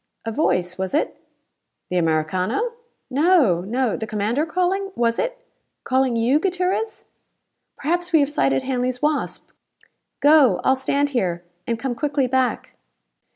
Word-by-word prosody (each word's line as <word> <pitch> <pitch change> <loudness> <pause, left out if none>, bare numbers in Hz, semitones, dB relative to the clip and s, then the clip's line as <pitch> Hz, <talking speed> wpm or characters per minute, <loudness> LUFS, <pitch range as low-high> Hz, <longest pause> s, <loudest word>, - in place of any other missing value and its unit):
"A 225 - -2
voice, 180 - 0
was 190 +6 -2
it?" 305 - 0 0.8
"The 180 - +1
Americano?" 180 - 0 0.4
"No! 280 - +4
No 240 +3 0
the 220 - -5
commander 220 +9 -1
calling? 370 +4 0
Was 230 -1 +1
it? - - -1 0.5
Calling 260 -1 +1
you, 240 +6 +3
Gutierrez? 375 +5 -1 0.7
Perhaps 350 +4 -1
we 320 - +5
have 285 -1 +2
sighted 135 - +1
Hanley's 250 -1 -2
Wasp. 300 0 -1 0.7
Go! 290 - +5
I'll 265 - +4
stand 280 +2 0
here, 180 -10 -1 0.2
and 230 - 0
come 255 +2 -3
quickly 285 +2 0
back." 255 -2 -1
260 Hz, 135 wpm, -22 LUFS, 220-315 Hz, 0.8 s, we